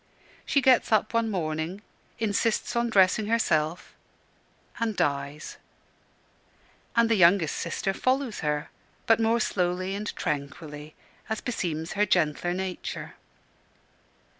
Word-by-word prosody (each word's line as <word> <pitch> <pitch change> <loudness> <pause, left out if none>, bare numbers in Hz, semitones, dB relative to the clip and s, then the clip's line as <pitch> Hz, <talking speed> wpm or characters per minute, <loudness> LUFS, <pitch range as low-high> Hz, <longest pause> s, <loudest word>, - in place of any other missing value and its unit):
She 280 - +3
gets 255 -3 +4
up 215 +1 +2
one 230 -1 +1
morning, 165 +1 -3 0.3
insists 225 +2 0
on 235 0 +1
dressing 205 0 +4
herself, 170 -8 0 0.9
and 225 -2 -1
dies; 140 0 -2 1.4
and 235 0 +5
the 230 - +2
youngest 175 -4 +4
sister 195 - -2
follows 255 0 0
her 150 -1 -2 0.3
but 225 0 +4
more 225 +1 +2
slowly 185 -2 -1
and 205 +1 -4
tranquilly, 150 +1 -5 0.3
as 220 - -1
beseems 165 -8 -3
her 210 +1 +2
gentler 170 0 +1
nature. 190 -1 -5
190 Hz, 115 wpm, -27 LUFS, 155-225 Hz, 1.4 s, and